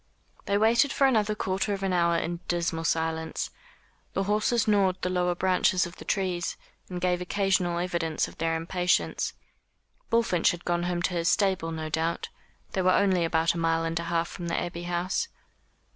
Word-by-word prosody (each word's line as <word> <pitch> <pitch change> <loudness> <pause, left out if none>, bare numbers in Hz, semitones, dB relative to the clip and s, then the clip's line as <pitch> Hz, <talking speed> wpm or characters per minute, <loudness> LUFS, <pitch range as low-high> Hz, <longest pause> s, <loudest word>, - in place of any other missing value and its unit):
They 200 - +2
waited 230 +5 +4
for 275 - +3
another 215 -5 +2
quarter 195 +1 -1
of 195 - -7
an 190 -1 0
hour 170 -1 +3
in 170 +1 -2
dismal 170 -1 -1
silence. 160 0 -1 0.6
The 195 - 0
horses 210 +3 +1
gnawed 195 -3 +3
the 180 - 0
lower 180 -1 +1
branches 185 0 +2
of 175 0 -9
the - - -10
trees, 185 -3 -1 0.3
and 180 -1 -4
gave 180 0 0
occasional 185 -2 +1
evidence 170 -3 -1
of - - -14
their 165 0 +1
impatience. 175 +2 0 0.8
Bullfinch 230 -7 +3
had 175 0 -4
gone 175 0 0
home 175 -1 -1
to 180 - 0
his 170 -1 +1
stable 190 -5 +1
no 160 -1 -4
doubt. 160 +2 -1 0.4
They 190 - 0
were 185 - +3
only 190 -3 +3
about 165 0 +2
a 170 - -4
mile 165 0 +1
and 165 0 -1
a 170 - -4
half 170 0 0
from 175 -2 -7
the 170 - 0
Abbey 175 0 -5
House. 175 - -1
175 Hz, 185 wpm, -27 LUFS, 170-190 Hz, 0.8 s, waited